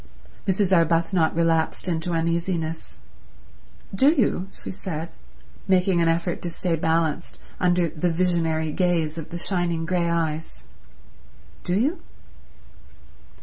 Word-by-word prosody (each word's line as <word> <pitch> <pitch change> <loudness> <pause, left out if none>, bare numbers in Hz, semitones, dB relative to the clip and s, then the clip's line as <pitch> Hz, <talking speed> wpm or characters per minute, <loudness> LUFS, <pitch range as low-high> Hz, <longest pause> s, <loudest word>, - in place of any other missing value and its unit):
Mrs. 190 0 +3
Arbuthnot 165 0 +2
relapsed 165 +1 +1
into 170 0 -1
uneasiness. 165 - -2 1.0
"Do 265 +9 +5
you?" 225 - +1
she - - -8
said, 170 -4 -5 0.6
making 185 -2 +3
an 165 - +3
effort 170 +1 0
to 175 - -3
stay 170 0 -1
balanced 160 0 0 0.2
under 175 -1 +3
the 165 +3 -1
visionary 165 -2 0
gaze 165 -2 0
of 155 - -8
the 170 - -5
shining 175 -2 0
grey 175 -1 0
eyes. 160 -2 -2 1.0
"Do 180 +1 0
you?" 295 +10 +1
170 Hz, 115 wpm, -24 LUFS, 165-180 Hz, 1.0 s, Do